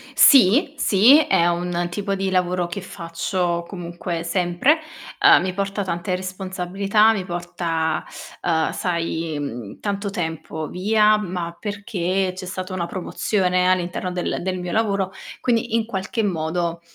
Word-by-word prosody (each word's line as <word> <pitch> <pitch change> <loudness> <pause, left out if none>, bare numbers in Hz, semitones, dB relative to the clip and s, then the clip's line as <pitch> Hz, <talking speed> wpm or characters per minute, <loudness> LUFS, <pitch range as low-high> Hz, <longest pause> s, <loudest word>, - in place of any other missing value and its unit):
Sì, 270 - +6
sì, 240 +4 +6
è 170 - +3
un 175 0 -1
tipo 200 +2 -2
di 195 0 -1
lavoro 180 -1 +1
che 175 +3 -5
faccio 170 0 -2
comunque 175 -2 -5
sempre. 180 - +2 0.4
Uhm, - - +7
mi 185 -1 -2
porta 200 +1 -2
tante 180 +1 -2
responsabilità, 190 +3 +1
mi 195 -4 -3
porta, 170 -2 -2 0.4
uhm, 160 -2 +1
sai, 165 -3 -2
mhmm, 120 -7 -6
tanto 200 0 -2
tempo 160 -3 -4
via, 210 +3 +3
ma 175 -4 -4
perché 195 -2 -2
c'è 185 0 -7
stata 185 +1 -5
una 180 -2 -2
promozione 185 0 0
all'interno 180 0 -1
del 180 -1 -2
del 185 0 -2
mio 180 -1 -4
lavoro. 200 -4 0 0.3
Quindi, 230 -1 0
in 230 -1 +2
qualche 215 +1 -2
modo, 170 -2 -1
185 Hz, 140 wpm, -22 LUFS, 175-200 Hz, 0.4 s, Uhm